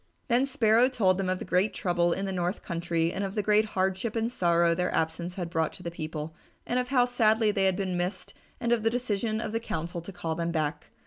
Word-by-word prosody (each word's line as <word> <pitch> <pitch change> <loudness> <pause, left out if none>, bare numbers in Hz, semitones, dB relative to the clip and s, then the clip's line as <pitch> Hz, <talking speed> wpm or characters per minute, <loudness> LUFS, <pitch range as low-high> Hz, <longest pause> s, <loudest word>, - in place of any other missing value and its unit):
Then 250 +3 +3
Sparrow 245 -2 +4
told 195 -7 +2
them 190 -1 -1
of 185 - 0
the - - -6
great 185 +4 +2
trouble 175 -1 +1
in 195 +3 -1
the 195 - -2
north 180 +1 -2
country 170 -1 -1
and 200 - -2
of 195 0 -4
the 210 - 0
great 210 +1 +4
hardship 190 +4 0
and 225 +1 0
sorrow 170 -5 +3
their 180 +1 -1
absence 165 +2 -2
had 180 -3 -3
brought 160 -1 0
to 180 - -9
the 170 - -4
people, 155 -1 -5 0.3
and 245 - 0
of 250 - -1
how 250 -2 +4
sadly 220 -3 +3
they 195 -2 +1
had 190 -1 +3
been 190 -2 -2
missed 175 +2 -3 0.3
and 235 - -1
of 240 -2 +3
the 225 - +2
decision 225 -2 -1
of 220 -1 -3
the 225 - -1
council 170 -5 -4
to 175 - -8
call 170 -3 -3
them 170 +1 -2
back. 150 -2 -2
190 Hz, 245 wpm, -28 LUFS, 170-220 Hz, 0.3 s, Sparrow